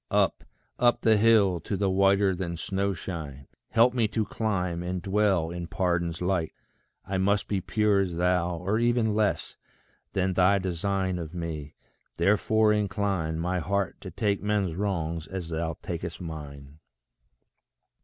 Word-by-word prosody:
Up, - - +1 0.4
up 120 0 +3
the 110 -1 +5
hill, 105 -4 +4
to 100 - -3
the 100 +1 +1
whiter 95 0 +3
than 85 -2 -4
snow 100 +3 -1
shine, 75 -7 -7 0.2
Help 115 +2 +4
me 120 -3 +2
to 110 0 -1
climb, 90 -7 -2
and 90 +1 -3
dwell 95 -3 +1
in 85 -1 -5
pardon's 85 -1 -1
light. 90 -3 0 0.5
I 95 -1 -2
must 100 +2 +1
be 100 -2 -1
pure 105 0 +2
as 90 -3 -1
thou, 90 0 +1
or 95 +6 0
ever 120 0 +2
less 105 -2 0 0.6
Than 95 0 +1
thy 95 +2 +4
design 95 0 -1
of 85 0 -7
me 80 -4 -5 0.4
therefore 105 +4 +3
incline 100 -5 -1
My 90 +2 -1
heart 100 +2 -2
to - - -7
take 100 -2 -1
men's 105 -4 0
wrongs 85 -4 -2
as 95 -3 -5
thou 80 0 -2
tak'st 85 -1 -5
mine. 75 -4 -8
95 Hz, 150 wpm, -27 LUFS, 85-100 Hz, 0.6 s, the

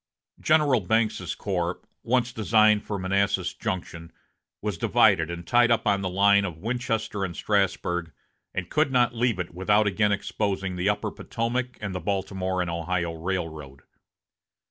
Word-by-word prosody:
General 150 -5 +3
Banks's 105 -2 0
corps, 90 -3 -2 0.2
once 125 0 0
designed 110 -1 +3
for 105 - -4
Manassas 95 -1 0
Junction, 90 -5 -5 0.5
was 105 -5 -4
divided 100 -9 +3
and 85 0 -6
tied 120 -1 +4
up 115 - +2
on 100 -2 +2
the 95 - -2
line 100 +2 +4
of 90 -5 -4
Winchester 115 -1 -2
and 85 -3 -4
Strasburg, 90 -4 0 0.4
and 95 -2 -5
could 155 -2 +2
not 125 -2 +3
leave 120 -2 +1
it 90 -2 -5
without 105 +4 +2
again 105 +1 +2
exposing 100 -2 -2
the 90 +3 0
upper 105 0 -1
Potomac 125 +1 -3
and 100 -3 -4
the 90 - -3
Baltimore 95 -1 -2
and 90 - -2
Ohio 85 0 -2
railroad. 80 -5 -5
100 Hz, 150 wpm, -26 LUFS, 90-110 Hz, 0.5 s, tied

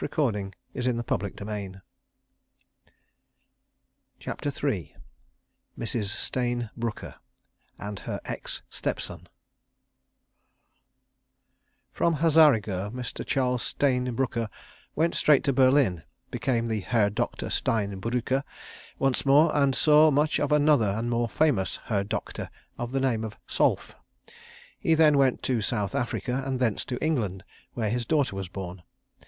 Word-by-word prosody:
His - - -2
daughter, 105 -10 0 0.2
alas! 125 -1 0
but - - -12
also 100 0 -6
hers. 100 -3 -5 2.4
CHAPTER 145 - -4 0.2
III 95 - -2 0.8
Mrs. 115 -2 -2
Stayne 120 +2 -2
Brooker—and 105 -2 -8
Her - - -5
Ex - - -5
Stepson - - -4 2.6
From 170 -1 +2
Hazarigurh 140 - +4
Mr. 125 +1 -5
Charles 125 -2 0
Stayne 125 -3 0
Brooker 115 -3 -1 0.5
went 165 +2 +2
straight 150 -3 +4
to 140 - +1
Berlin, 130 - +4 0.3
became 125 -5 0
the 110 -2 -1
Herr 105 0 +1
Doktor 120 +4 -3
Stein 100 -6 0
Brücker 125 +4 0 0.6
once 135 -2 +1
more, 150 +3 +5
and 140 -2 +3
saw 155 0 +6
much 150 +1 +2
of 145 - 0
another 150 -7 +4
and 110 +4 -2
more 120 0 0
famous 135 -12 +1
Herr 100 -4 0
Doktor 100 - -4 0.3
of 120 0 -5
the 135 - 0
name 125 -5 +1
of 110 -2 -6
Solf. - - +1 0.9
He 165 - +3
then 155 -3 +5
went 130 -2 +2
to 125 -4 +1
South 105 -2 -1
Africa 125 +2 -1
and 130 -1 -2
thence 115 -5 +1
to 125 - -3
England, 105 - -1 0.3
where 110 -3 -1
his 120 0 -1
daughter 145 -9 +1
was 95 -1 -4
born. 90 -1 -7
120 Hz, 125 wpm, -27 LUFS, 105-140 Hz, 2.6 s, saw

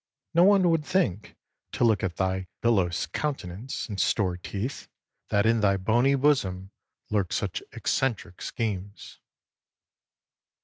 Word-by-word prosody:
No 170 - +6
one 195 -2 +5
would 165 -2 +1
think, 150 - -1 0.4
to - - 0
look 110 -4 +4
at 90 -3 -1
thy 95 0 -1
bilious 95 -7 +2
countenance 130 -5 -4
and 100 -4 -2
store 95 -5 +1
teeth, 100 +8 -5 0.4
that 100 +1 +2
in 115 0 +3
thy 100 -1 +3
bony 120 +8 +3
bosom 100 -10 +1 0.4
lurked 100 -4 0
such - - -2
eccentric 115 -9 -2
schemes. 100 -3 -5
105 Hz, 125 wpm, -27 LUFS, 95-135 Hz, 0.4 s, No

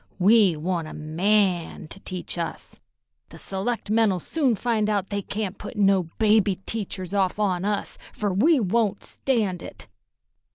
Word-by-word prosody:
"We 195 -3 +5
want 170 0 -2
a - - -8
man 175 +2 0
to 195 - -8
teach 185 -2 -4
us. 170 -1 -5 0.5
The 165 - -12
selectmen'll 210 +1 0
soon 265 - 0
find 220 -1 0
out 200 -2 -1
they 200 0 -1
can't 200 0 -4
put 210 - -8
no 195 -4 +3
baby 215 -2 +3
teachers 195 -4 -4
off 195 -2 +1
on 190 -3 0
us, 205 -1 -2
fer 205 -3 -2
we 285 - +4
won't 210 -1 0
stand 210 -9 -1
it." - - -10
200 Hz, 150 wpm, -25 LUFS, 185-215 Hz, 0.5 s, We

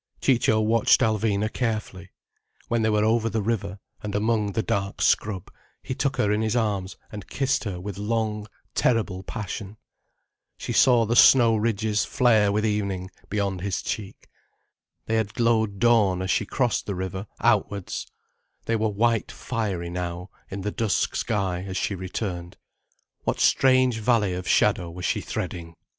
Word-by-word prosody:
Ciccio 115 -4 +3
watched 110 +1 +3
Alvina 110 -1 +1
carefully. 110 -6 -3 0.6
When 115 -1 +1
they 110 - +2
were 105 -1 +2
over 115 0 +2
the 110 0 -1
river, 100 -3 -2 0.2
and 105 -1 -4
among 105 -1 0
the 110 - 0
dark 100 0 -2
scrub, 100 -4 +1 0.3
he - - -4
took 135 0 -1
her 105 - +2
in 105 +1 +1
his 110 +1 0
arms 100 -5 -1
and 105 -1 -8
kissed 135 -2 -1
her 95 -4 -4
with 100 +1 -6
long, 105 0 -2 0.3
terrible 110 -6 +1
passion. 105 0 -6 0.8
She - - -4
saw 120 -3 +5
the 115 +2 0
snow 120 -3 +7
ridges 110 -1 0
flare 110 -6 +3
with 105 +2 0
evening, 100 -3 -2 0.2
beyond 100 -3 -1
his 100 -1 -2
cheek. 100 -2 -5 0.8
They 110 - 0
had 110 -2 -2
glowed 110 -4 +1
dawn 100 -5 +3
as 95 - -1
she - - 0
crossed 125 -4 0
the 100 - -2
river 95 +2 -4
outwards, 100 -3 0 0.6
they 115 - 0
were 110 0 +1
white 115 +2 +1
fiery 100 -8 -3
now 90 +1 -5 0.2
in 95 0 -5
the 105 +2 -2
dusk 110 -4 0
sky 95 -6 -1
as 95 0 -4
she 100 - -1
returned. 90 -2 -5 0.7
What - - -1
strange 130 -3 +4
valley 110 -4 +2
of 90 0 -5
shadow 85 - +2
was 90 +2 -6
she - - 0
threading? 85 -2 -5
105 Hz, 160 wpm, -25 LUFS, 95-115 Hz, 0.8 s, snow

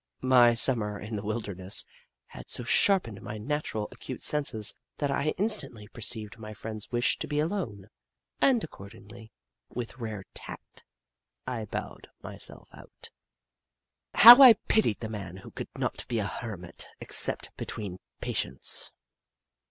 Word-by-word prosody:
My 125 -2 +5
Sum 120 +1 +2
mer 105 -1 -4
in 105 +2 -7
the 100 - -3
wilderness 100 -3 -1 0.4
had - - -12
so 125 - -4
sharpened 120 - +2
my 105 +1 -7
naturally 110 -2 -3
acute - - -8
senses, 140 -8 +3 0.2
that 145 -2 -1
I 140 +2 -1
instantly 155 - +1
perceived 110 -2 -5
my 110 -1 -9
friend's 110 0 -7
wish 120 0 +1
to - - -4
be 150 0 -1
alone, 150 - -3 0.5
and 250 -5 +3
accordingly, 110 -2 -12 0.4
with 120 +1 -7
rare 110 -4 -5
tact, - - -7 0.6
I 120 -4 -4
bowed - - -7 0.2
myself - - -6
out. - - -13 1.0
How 240 +5 +11
I 255 -4 +11
pitied 210 - 0
the 110 - -3
man 100 -5 -7
who 95 - -12
could - - -7
not - - -3
be 120 - -2
a 105 - -1
hermit 95 -4 -6
except - - +2
between 100 -5 -6 0.2
patients 65 +1 -2
115 Hz, 140 wpm, -28 LUFS, 105-140 Hz, 1.0 s, How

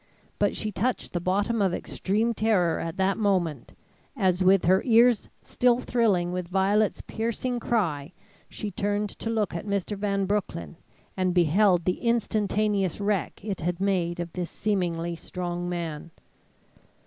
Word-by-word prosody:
But - - +2
she 215 - -3
touched 240 +5 -2
the 175 - 0
bottom 205 +5 0
of 190 -3 +2
extreme 220 +5 -1
terror 205 -7 +2
at 165 -1 -4
that 190 +1 +1
moment, 175 - 0 0.4
as 185 -4 +2
with 190 -1 +4
her 185 +3 +4
ears 235 -2 +4
still 245 -1 +2
thrilling 205 -9 +1
with 180 -1 -3
Violet's 195 +3 +1
piercing 235 +2 -3
cry, 165 -12 -1 0.4
she 210 - -5
turned 205 +2 -1
to 225 - -6
look 220 -4 0
at 170 +4 -5
Mr. 200 +1 -1
Van 200 -1 -1
Broecklyn, 185 - -3 0.4
and 185 -1 0
beheld 175 +1 +4
the 180 - 0
instantaneous 210 -5 0
wreck 200 -1 -2
it 200 -3 -3
had 175 +2 -2
made 180 -3 0
of 175 -1 -5
this 180 -2 -3
seemingly 175 -5 -1
strong 175 +1 -4
man. 170 -3 -4
195 Hz, 150 wpm, -26 LUFS, 175-210 Hz, 0.4 s, with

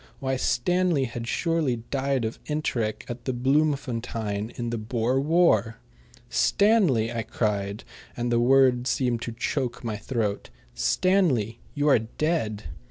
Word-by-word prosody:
Why, 130 0 -1
Stanley 175 +4 +1
had 120 -2 -5
surely 165 -4 0 0.2
died 135 -3 0
of 110 - -4
enteric 120 -8 -2
at 120 0 -7
Bloemfontein 120 -5 -1
in 120 -1 -3
the 115 - -2
Boer 120 +3 0
War! 150 -7 +3 0.5
"Stanley!" 190 - +3
I 115 - -1
cried, 105 -1 -2 0.3
and 120 0 -1
the 120 - +3
words 130 0 +4
seemed 120 -3 0
to 120 - -4
choke 125 +1 -3
my 110 -3 -3
throat 105 -2 -2 0.2
"Stanley, 115 - +1 0.2
you 145 0 +1
are 140 - +6
dead." 115 -2 -2
120 Hz, 130 wpm, -26 LUFS, 115-140 Hz, 0.5 s, are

